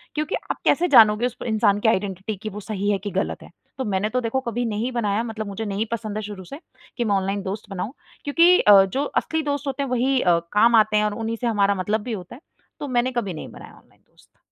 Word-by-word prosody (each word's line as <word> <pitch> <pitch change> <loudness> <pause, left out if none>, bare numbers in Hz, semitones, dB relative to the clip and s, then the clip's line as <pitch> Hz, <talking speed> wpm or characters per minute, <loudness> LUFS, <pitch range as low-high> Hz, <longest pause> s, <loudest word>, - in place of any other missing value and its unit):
क्योंकि 305 +5 -1 0.2
आप - - -5
कैसे 355 - +3
जानोगे 225 -4 +6
उस 250 - -3
इंसान 215 -3 +2
की 220 - 0
आइडेंटिटी 200 0 -2
कि 215 - -4
वो 210 +1 -8
सही 205 -1 -3
है 200 - +1
कि 205 - -4
गलत 190 - -2
है। - - -14 0.3
तो 260 - -2
मैंने 205 +1 -1
तो 250 +1 -1
देखो 235 +3 -1
कभी 240 0 -3
नहीं 225 +3 -2
बनाया, 220 -2 0
मतलब 220 -2 -5
मुझे 200 +3 -5
नहीं 205 +2 -2
पसंद 215 -2 -4
है - - -2
शुरू 200 -2 -7
से, 280 - -10 0.4
कि 240 - 0
मैं 205 -3 +1
ऑनलाइन 195 +1 -1
दोस्त 205 +2 -6
बनाऊँ। 195 +6 -5 0.3
क्योंकि 335 +5 +5
अ, 200 -2 +7
जो 270 +9 -2
असली 320 +2 -1
दोस्त 285 -1 -3
होते 275 +1 -2
हैं, 270 - -4
वही 255 +1 +1
अ, 170 -1 +3
काम 230 +3 +5
आते 215 -1 +4
हैं 210 - +3
और 210 - -1
उन्हीं 225 +1 -3
से 240 - 0
हमारा 200 -3 +2
मतलब 205 +3 -1
भी 235 +1 -5
होता 185 +3 -7
है। 280 - -16 0.4
तो 290 - -5
मैंने 250 0 0
कभी 215 -7 -2
नहीं 155 - -7
बनाया - - -12
ऑनलाइन - - -25
दोस्त। - - -27
220 Hz, 250 wpm, -23 LUFS, 200-245 Hz, 0.4 s, अ